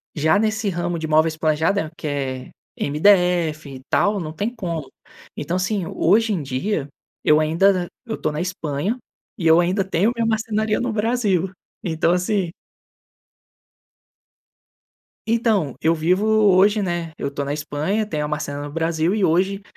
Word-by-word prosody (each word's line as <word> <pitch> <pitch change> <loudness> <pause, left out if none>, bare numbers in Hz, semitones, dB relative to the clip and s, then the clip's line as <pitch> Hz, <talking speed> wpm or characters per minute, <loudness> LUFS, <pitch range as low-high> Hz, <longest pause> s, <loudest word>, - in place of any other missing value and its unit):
Já 160 +6 +3
nesse 220 0 0
ramo 175 -1 -2
de 160 -1 -4
móveis 155 +1 +2
planejados 160 +3 +1
que - - -5
é 135 -3 -3 0.3
MDF 165 -1 +2
e 130 -1 -9
tal, 205 0 +2
não 155 -3 -5
tem 210 +8 -3
como. 170 - -5 0.5
Então, 180 - -2
assim, 190 0 -1
hoje 215 +7 +2
em 180 - -1
dia 140 +3 -2 0.3
eu 150 0 +5
ainda 175 +4 +2 0.2
eu 225 -2 -4
tô 155 - -1
na 150 - -4
Espanha, 180 - -2 0.4
e 170 -5 0
eu 160 +1 +6
ainda 185 +3 +1
tenho 190 +3 +1
minha 230 -1 0
marcenaria 220 -1 0
no 240 -2 -2
Brasil. 210 -5 0 0.3
Então 165 0 +1
assim 180 0 0 2.8
Então, 220 - +1
eu 165 +1 +3
vivo 175 +5 +1
hoje, 210 -1 +4
né 175 -3 -3
eu 140 - -3
estou 140 0 -4
na 140 - -3
Espanha, 155 +8 -2
tenho 155 -7 -3
a - - -3
marcenaria 145 -1 -4
no 145 0 -6
Brasil 165 +3 0
e 205 -3 +2
hoje 190 +4 +1
175 Hz, 155 wpm, -21 LUFS, 155-205 Hz, 2.8 s, eu